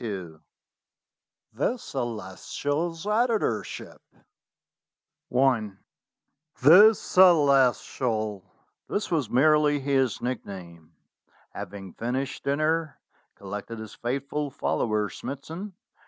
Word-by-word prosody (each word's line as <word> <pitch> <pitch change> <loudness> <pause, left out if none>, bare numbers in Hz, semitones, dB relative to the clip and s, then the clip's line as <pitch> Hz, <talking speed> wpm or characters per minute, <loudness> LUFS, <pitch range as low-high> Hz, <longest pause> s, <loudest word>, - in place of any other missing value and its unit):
XXII 95 -8 -6 1.1
THE 150 - 0
CELESTIAL'S 145 - -4
EDITORSHIP 215 - -1 1.3
THE 135 - +3
Celestial 130 - +3 0.5
(this 205 - -2
was 150 -9 0
merely 150 +2 +4
his 135 -4 +1
nickname), 90 -9 -7 0.6
having 95 -3 -8
finished 130 +4 -3
dinner, 155 +2 0 0.4
collected 105 +3 -7
his 110 -1 -9
faithful 140 +4 -3
follower 110 -5 -1
Smithson. 165 - -7
135 Hz, 70 wpm, -26 LUFS, 110-155 Hz, 1.3 s, merely